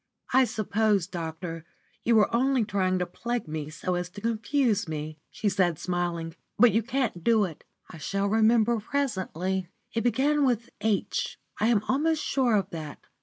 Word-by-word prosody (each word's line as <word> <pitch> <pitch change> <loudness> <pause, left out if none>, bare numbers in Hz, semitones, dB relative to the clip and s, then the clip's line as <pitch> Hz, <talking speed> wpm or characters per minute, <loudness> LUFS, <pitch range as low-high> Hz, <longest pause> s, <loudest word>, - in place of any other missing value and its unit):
"I 260 0 +6
suppose, 215 -4 +1
doctor, 165 -2 -5 0.4
you 235 - +3
were 215 +1 +4
only 260 -1 +2
trying 185 -2 +1
to 180 - 0
plague 235 +6 -4
me 155 -1 -4
so 170 +4 -3
as 180 0 -2
to 205 +3 -10
confuse 230 -1 +1
me," 155 0 -5
she 165 +8 -3
said, 180 -4 +2
smiling. 175 -2 -2 0.2
"But 240 +1 +7
you 225 - +2
can't 235 -7 -2
do 225 -2 +4
it. 165 -5 -9 0.2
I 165 - -11
shall 195 +6 -1
remember 225 +2 +3
presently. 190 - -2 0.3
It 230 - 0
began 285 +5 +2
with 240 -3 0
'H' 215 -2 -1 0.2
I 215 - +3
am 225 -3 +3
almost 305 +4 +1
sure 250 -5 +2
of 200 - 0
that. 155 -3 -7
205 Hz, 170 wpm, -27 LUFS, 175-235 Hz, 0.4 s, But